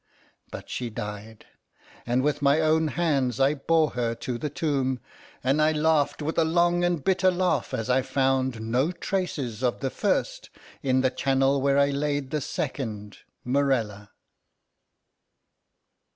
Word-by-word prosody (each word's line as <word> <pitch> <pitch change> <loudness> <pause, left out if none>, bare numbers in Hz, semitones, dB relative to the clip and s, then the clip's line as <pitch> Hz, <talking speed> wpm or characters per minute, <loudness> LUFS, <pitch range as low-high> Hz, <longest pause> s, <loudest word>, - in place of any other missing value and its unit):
But - - -9
she 120 -2 -4
died; 105 0 -7 0.6
and 125 +2 +1
with 145 0 0
my 140 +2 +4
own 160 0 +2
hands 140 -5 0
I 135 +2 +4
bore 155 +2 +1
her 115 -1 -2
to 120 +1 -5
the 150 - -3
tomb; 135 -4 -1 0.4
and 135 +4 +2
I 155 +1 +3
laughed 155 -1 +1
with 160 +3 -1
a - - +5
long 175 +2 +2
and 175 -5 0
bitter 185 0 +3
laugh 180 -7 0
as 110 - -3
I 130 +1 +3
found 130 -3 0
no 125 +8 0
traces 150 - -3
of 125 -2 0
the 135 -1 -2
first - - -1 0.3
in 130 -1 +2
the 130 -1 +2
charnel 135 +1 +1
where 140 0 +2
I 140 0 +3
laid 145 -1 -2
the 150 - -1
second, 105 -7 -4 0.3
Morella. 125 -6 0
140 Hz, 150 wpm, -26 LUFS, 125-155 Hz, 0.6 s, a